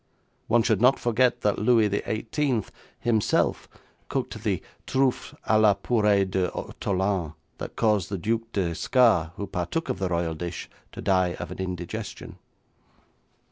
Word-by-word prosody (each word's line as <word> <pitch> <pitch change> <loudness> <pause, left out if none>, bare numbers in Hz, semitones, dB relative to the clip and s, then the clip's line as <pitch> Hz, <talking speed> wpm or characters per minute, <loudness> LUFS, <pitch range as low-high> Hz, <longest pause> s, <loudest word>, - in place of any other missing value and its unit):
One 115 0 +4
should 110 -3 +1
not 130 +2 +5
forget 120 +1 +2
that 105 - +1
Louis 110 0 +4
XVIII 110 +4 -1 0.4
himself 110 -3 +1 0.4
cooked - - -3
the - - -1 0.2
truffes 130 -1 0
à 110 0 +4
la 105 -2 +5
purée 105 -4 +2
d'ortolans 95 -1 -1 0.3
that - - -6
caused 105 -5 +1
the 100 - -2
Duc 115 +5 -2
d'Escars, 90 - +2
who 100 - -4
partook 95 - -3
of - - -2
the 95 -1 -1
royal 85 -1 0
dish, 85 +2 -6 0.2
to - - -7
die 90 -2 +2
of 85 - -7
an 90 - -8
indigestion. 95 +3 -5
105 Hz, 140 wpm, -26 LUFS, 90-115 Hz, 0.4 s, not